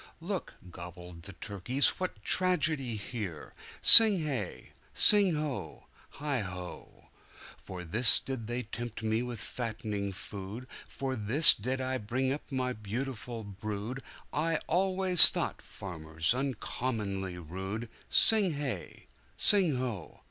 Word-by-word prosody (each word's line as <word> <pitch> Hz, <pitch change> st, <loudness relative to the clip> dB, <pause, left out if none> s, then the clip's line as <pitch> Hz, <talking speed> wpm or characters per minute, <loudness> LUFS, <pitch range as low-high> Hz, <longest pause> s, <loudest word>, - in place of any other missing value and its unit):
"Look!" 185 Hz, +2 st, -5 dB, 0.2 s
gobbled 90 Hz, 0 st, -11 dB
the 95 Hz, +4 st, -11 dB
turkey's, 110 Hz, +9 st, 0 dB
"what 180 Hz, -, -5 dB
tragedy's 155 Hz, -, -1 dB
here!" 100 Hz, -10 st, -7 dB, 0.3 s
Sing 220 Hz, -4 st, +10 dB
hey! 135 Hz, -, -5 dB, 0.2 s
sing 200 Hz, -5 st, +5 dB
ho! 135 Hz, -, -6 dB, 0.3 s
heigho!"For 95 Hz, -6 st, -9 dB
this 110 Hz, +9 st, +4 dB
did 130 Hz, -5 st, -7 dB
they 120 Hz, +1 st, -4 dB
tempt 115 Hz, 0 st, -8 dB
me 110 Hz, +1 st, -1 dB
with 125 Hz, -2 st, -6 dB
fattening 105 Hz, -4 st, -5 dB
food, 100 Hz, +5 st, -9 dB, 0.2 s
For 135 Hz, -1 st, -5 dB
this 120 Hz, +8 st, +5 dB
did 125 Hz, +5 st, -4 dB
I 130 Hz, 0 st, -3 dB
bring 130 Hz, +5 st, -2 dB
up 145 Hz, -, -9 dB
my 130 Hz, -1 st, -2 dB
beautiful 115 Hz, +1 st, -6 dB
brood,I 110 Hz, -, -5 dB
always 185 Hz, 0 st, +6 dB
thought -, -, -4 dB
farmers 80 Hz, -1 st, -3 dB
uncommonly 110 Hz, -7 st, -4 dB
rude!" 95 Hz, +7 st, -7 dB, 0.2 s
Sing 210 Hz, -6 st, +4 dB
hey! 130 Hz, -, -6 dB, 0.3 s
sing 185 Hz, -8 st, +3 dB
ho! 120 Hz, -9 st, -6 dB
120 Hz, 110 wpm, -29 LUFS, 100-140 Hz, 0.3 s, Sing